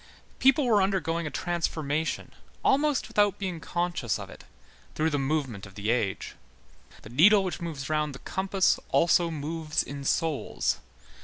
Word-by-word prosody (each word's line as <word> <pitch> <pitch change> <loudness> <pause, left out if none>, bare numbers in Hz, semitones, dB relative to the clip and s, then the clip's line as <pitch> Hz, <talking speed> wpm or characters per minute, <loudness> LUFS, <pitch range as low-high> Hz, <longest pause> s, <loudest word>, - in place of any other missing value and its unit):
People 270 +2 +5
were 215 -4 +4
undergoing 170 -4 0
a - - -2
transformation, 160 0 -2 0.3
almost 290 0 +2
without 205 -2 +2
being 185 -4 -4
conscious 175 -9 -1
of - - -8
it, - - -13 0.5
through 160 +1 +1
the 145 - 0
movement 135 -8 -2
of 95 - -16
the 105 +2 -1
age. 110 -6 -1 0.7
The - - -10
needle 195 - +6
which 180 -3 -4
moves 150 -6 -5
round 150 -2 -1
the - - -10
compass 190 0 +1
also 170 0 +3
moves 155 0 -2
in 140 0 -7
souls. 155 +1 0
160 Hz, 150 wpm, -27 LUFS, 140-190 Hz, 0.7 s, needle